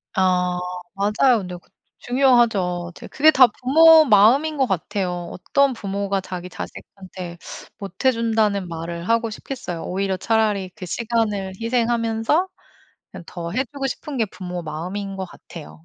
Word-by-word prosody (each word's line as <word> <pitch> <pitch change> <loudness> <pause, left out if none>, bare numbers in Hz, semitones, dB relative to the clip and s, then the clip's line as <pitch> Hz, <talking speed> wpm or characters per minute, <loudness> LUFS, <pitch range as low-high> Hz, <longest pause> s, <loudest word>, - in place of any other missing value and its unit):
아 180 -1 +2 0.4
맞아요. 210 +6 +3
근데 180 -2 -6
그 175 - -22 0.3
중요하죠. 225 -9 +2
이제 - - -10
그게 310 +2 +4
다 260 -4 +7
부모 320 +6 +6
마음인 260 +8 +4
것 270 - +3
같아요. 180 -3 -3
어떤 280 +8 +1
부모가 200 -2 -2
자기 180 -1 -7
자식한테 185 -2 -9 0.4
못 195 +1 -8
해 260 - +5
준다는 220 -5 0
말을 170 +1 -6
하고 230 0 +1
싶겠어요. 215 -7 -6
오히려 190 +1 -2
차라리 210 -2 0
그 185 - -8
시간을 210 -2 -2
희생하면서 230 +6 +1 0.6
그냥 - - -10
더 170 -1 -6
해 255 +7 0
주고 275 -2 -3
싶은 275 +1 -6
게 225 - +2
부모 180 -3 -7
마음인 180 +6 -5
것 190 -1 -4
같아요. 80 - -13
200 Hz, 310 characters per minute, -22 LUFS, 180-240 Hz, 0.6 s, 다